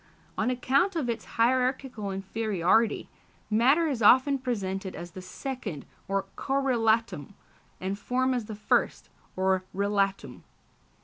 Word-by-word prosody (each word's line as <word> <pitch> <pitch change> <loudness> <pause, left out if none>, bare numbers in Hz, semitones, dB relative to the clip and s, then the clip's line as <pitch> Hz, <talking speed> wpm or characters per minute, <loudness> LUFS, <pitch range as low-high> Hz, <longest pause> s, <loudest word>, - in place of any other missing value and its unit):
On - - 0
account 270 +9 +1
of 270 -8 0
its 230 - -5
hierarchical 250 -2 +1
inferiority, 200 +1 0 0.4
matter 265 +10 +4
is 265 -6 -2
often 260 +6 +5
presented 195 -7 -3
as 175 0 -8
the 185 - -9
second, 195 - -6 0.2
or 195 0 -1
correlatum, 230 - 0 0.4
and 195 +2 -3
form 255 +4 0
as 245 -3 -2
the 215 0 -7
first, 210 - 0 0.3
or 190 0 +1
relatum. 200 0 -1
225 Hz, 120 wpm, -28 LUFS, 195-255 Hz, 0.4 s, often